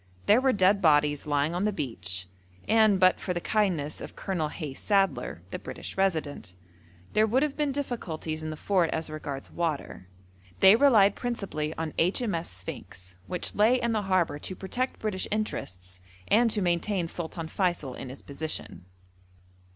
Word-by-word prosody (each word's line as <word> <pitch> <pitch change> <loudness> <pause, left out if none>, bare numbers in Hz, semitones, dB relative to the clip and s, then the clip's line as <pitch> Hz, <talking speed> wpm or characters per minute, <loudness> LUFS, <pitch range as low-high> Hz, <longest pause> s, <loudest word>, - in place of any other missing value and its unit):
There 215 +5 +5
were 265 0 +4
dead 200 -1 +3
bodies 150 -2 +3
lying 145 +2 +1
on 180 +3 0
the 210 - +2
beach, 95 - -3 0.4
and 215 -3 +5
but 185 0 +5
for 180 - -3
the - - 0
kindness 175 -8 0
of - - -8
Colonel 175 -6 -2
Hayes 150 -4 -6
Sadler, 190 - +1
the - - -4
British - - -7
Resident, 155 - -1 0.6
there 215 +1 +4
would 255 +6 +2
have 300 -2 -1
been 295 -2 0
difficulties 175 - -3
in 155 - -4
the 155 - -4
fort 180 -1 +2
as 160 -1 -3
regards 145 -3 -6
water. 155 - -3 0.5
They 190 +2 +8
relied 225 -6 +5
principally 200 -11 -3
on 160 -1 -4
H.M.S. 180 -1 0
Sphinx, 95 0 -7
which 180 - -3
lay 225 +5 +4
in 235 -1 0
the 220 -2 +1
harbour 185 -6 +1
to 185 - -5
protect 245 +8 -3
British 210 -4 -2
interests, 95 - -4 0.3
and 230 +3 +4
to 210 -3 0
maintain 175 +1 0
Sultan 165 -1 -5
Feysul 175 -7 -1
in 130 - -7
his 130 - -10
position. 145 - -4
175 Hz, 165 wpm, -28 LUFS, 150-210 Hz, 0.6 s, They